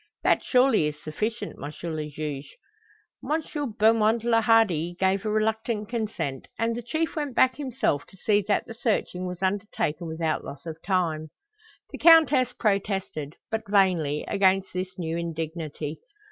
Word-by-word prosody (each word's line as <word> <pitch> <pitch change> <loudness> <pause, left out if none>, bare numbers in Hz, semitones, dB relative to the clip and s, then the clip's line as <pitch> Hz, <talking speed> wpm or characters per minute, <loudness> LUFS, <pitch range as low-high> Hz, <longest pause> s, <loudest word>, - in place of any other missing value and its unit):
That - - +3
surely 250 - +4
is 150 0 -5
sufficient, 210 +7 -4
M. 145 - -4 0.2
le 155 -1 -4
Juge?" 145 -1 -6 0.7
M. 300 -3 -2
Beaumont 220 +1 +4
le 230 -1 +3
Hardi 190 -7 +3
gave 190 +1 +2
a 215 - -1
reluctant 215 0 0
consent, 215 - -3
and 230 0 0
the 240 - -4
Chief 315 +7 -2
went 290 -5 -3
back 260 0 +4
himself 260 - -1
to 190 - -18
see 205 +2 +2
that 205 - +1
the 230 - -8
searching 215 -6 -1
was 180 +1 -6
undertaken 190 -5 -1
without 160 0 -1
loss 140 +3 -9
of 165 -1 -7
time. 165 -5 0 0.6
The - - -7
Countess 300 -6 +6
protested, 195 -8 -1 0.2
but 220 -2 -3
vainly, 180 -7 +2
against 195 -1 +2
this 185 +1 -4
new 165 -2 -2
indignity. 160 -2 -4
195 Hz, 150 wpm, -26 LUFS, 160-225 Hz, 0.7 s, Countess